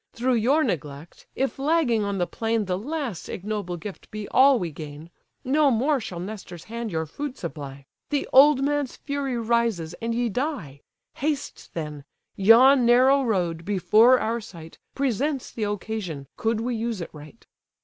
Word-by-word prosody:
Through 250 Hz, +2 st, 0 dB
your 285 Hz, +8 st, +3 dB
neglect, 150 Hz, -, -5 dB
if 270 Hz, +1 st, -2 dB
lagging 275 Hz, -7 st, +2 dB
on 200 Hz, -1 st, -2 dB
the 175 Hz, -, +1 dB
plain 225 Hz, +2 st, -1 dB
The 185 Hz, -1 st, -1 dB
last 255 Hz, -, -4 dB
ignoble 200 Hz, -3 st, -4 dB
gift 195 Hz, +4 st, -9 dB
be 215 Hz, -1 st, -6 dB
all 270 Hz, 0 st, +6 dB
we 175 Hz, -7 st, -3 dB
gain, 150 Hz, +2 st, -9 dB, 0.3 s
No 290 Hz, +3 st, +3 dB
more 270 Hz, +4 st, +2 dB
shall 185 Hz, -7 st, -6 dB
Nestor's 185 Hz, -3 st, -8 dB
hand 230 Hz, -1 st, -5 dB
your 160 Hz, -1 st, -1 dB
food 275 Hz, -, -6 dB
supply, 140 Hz, -4 st, -7 dB, 0.2 s
The 290 Hz, -2 st, -1 dB
old 275 Hz, 0 st, +7 dB
man's 290 Hz, -2 st, -1 dB
fury 280 Hz, -3 st, -3 dB
rises, 230 Hz, -8 st, 0 dB
and 230 Hz, 0 st, -2 dB
ye 240 Hz, 0 st, +1 dB
die. 225 Hz, -, -3 dB, 0.4 s
Haste 290 Hz, 0 st, -4 dB
then: 150 Hz, -3 st, -5 dB, 0.3 s
yon 245 Hz, +6 st, +6 dB
narrow 255 Hz, +4 st, +5 dB
road, 175 Hz, -8 st, -1 dB
before 215 Hz, +6 st, +4 dB
our 230 Hz, +1 st, -1 dB
sight, 165 Hz, -5 st, -12 dB, 0.2 s
Presents 275 Hz, +1 st, -1 dB
the 220 Hz, -, -3 dB
occasion, 205 Hz, -8 st, -4 dB
could 225 Hz, 0 st, -1 dB
we 245 Hz, +1 st, -2 dB
use 225 Hz, -2 st, -2 dB
it 170 Hz, -, -6 dB
right." 150 Hz, +8 st, -13 dB
225 Hz, 160 wpm, -25 LUFS, 175-260 Hz, 0.4 s, old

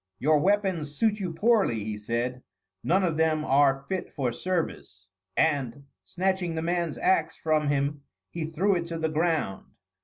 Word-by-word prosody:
"Your 150 Hz, +6 st, +3 dB
weapons 185 Hz, -5 st, 0 dB
suit 215 Hz, +4 st, +1 dB
you 185 Hz, -4 st, -3 dB
poorly," 195 Hz, -, +2 dB
he 105 Hz, 0 st, -4 dB
said, 120 Hz, +4 st, -3 dB, 0.4 s
"none 190 Hz, +3 st, +2 dB
of 165 Hz, -4 st, 0 dB
them 155 Hz, -1 st, +1 dB
are 135 Hz, -1 st, +3 dB
fit 190 Hz, -1 st, -3 dB
for 130 Hz, -5 st, 0 dB
service." 160 Hz, -, -3 dB, 0.3 s
And, 140 Hz, -4 st, +1 dB, 0.2 s
snatching 185 Hz, -2 st, -1 dB
the 160 Hz, -, -2 dB
man's 170 Hz, -2 st, -1 dB
axe 165 Hz, -4 st, +1 dB
from 155 Hz, -2 st, +1 dB
him 145 Hz, 0 st, 0 dB, 0.3 s
he 170 Hz, -2 st, -3 dB
threw 170 Hz, +6 st, +1 dB
it 170 Hz, -1 st, -2 dB
to 165 Hz, -, -4 dB
the 160 Hz, -1 st, -1 dB
ground. 155 Hz, -, -1 dB
160 Hz, 160 wpm, -27 LUFS, 140-180 Hz, 0.4 s, Your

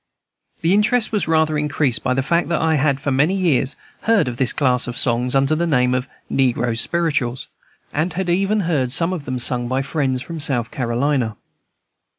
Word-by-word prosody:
This 165 Hz, -, +3 dB
interest 215 Hz, +3 st, +2 dB
was 210 Hz, -6 st, -1 dB
rather 160 Hz, -1 st, +2 dB
increased 145 Hz, -4 st, 0 dB
by 130 Hz, -, 0 dB
the 135 Hz, -, 0 dB
fact 170 Hz, +5 st, +1 dB
that 170 Hz, -, +1 dB
I 160 Hz, 0 st, +2 dB
had 140 Hz, -2 st, +1 dB
for 140 Hz, -, -2 dB
many 150 Hz, +8 st, +2 dB
years 150 Hz, -8 st, +1 dB, 0.3 s
heard 225 Hz, -, +2 dB
of 120 Hz, -1 st, -4 dB
this 130 Hz, -2 st, +1 dB
class 125 Hz, -3 st, +1 dB
of 120 Hz, 0 st, -5 dB
songs 125 Hz, +1 st, 0 dB
under 135 Hz, +2 st, +3 dB
the 170 Hz, +2 st, 0 dB
name 125 Hz, -5 st, +2 dB
of 125 Hz, +1 st, -1 dB, 0.2 s
"Negro 125 Hz, -3 st, +1 dB
Spirituals," 135 Hz, -3 st, -1 dB, 0.5 s
and 155 Hz, +4 st, 0 dB
had 190 Hz, 0 st, -2 dB
even 195 Hz, +4 st, +1 dB
heard 150 Hz, -8 st, 0 dB
some 165 Hz, +6 st, 0 dB
of 160 Hz, -6 st, -5 dB
them 130 Hz, 0 st, -3 dB
sung 120 Hz, 0 st, 0 dB
by 130 Hz, +2 st, -1 dB
friends 135 Hz, -3 st, -1 dB
from 165 Hz, -1 st, -7 dB
South 125 Hz, -6 st, +1 dB
Carolina. 120 Hz, -2 st, -1 dB
140 Hz, 190 wpm, -20 LUFS, 125-165 Hz, 0.5 s, This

